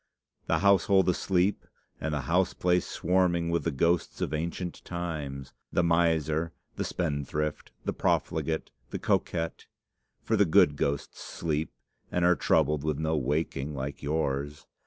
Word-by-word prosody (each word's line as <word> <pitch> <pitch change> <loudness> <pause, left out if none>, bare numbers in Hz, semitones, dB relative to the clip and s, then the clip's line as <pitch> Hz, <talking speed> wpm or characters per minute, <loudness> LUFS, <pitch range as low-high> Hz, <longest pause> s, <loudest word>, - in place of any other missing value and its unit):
The - - +3
household 100 -1 +4
asleep, 90 +2 +1 0.4
and 80 - -2
the 75 -1 -1
house 90 +7 +1
place 90 0 +2
swarming 85 -1 +1
with 85 - 0
the 85 - +1
ghosts 85 +4 +1
of - - -2
ancient 85 +3 -3
times, 75 -6 -5 0.2
the 90 - +2
miser, 80 -1 +2 0.2
the - - -2
spendthrift, 75 -2 -2
the - - 0
profligate, 80 -1 0 0.2
the - - -3
coquette, 85 -1 -1 0.6
for - - +1
the 100 - +5
good 85 -3 +5
ghosts 70 0 -2
sleep, 80 -1 -2 0.4
and 90 -1 +1
are 90 0 +5
troubled 75 -3 +2
with 75 -2 0
no 80 +1 0
waking 75 0 -1
like 70 +1 -5
yours! 75 -1 -2
80 Hz, 140 wpm, -28 LUFS, 75-90 Hz, 0.6 s, the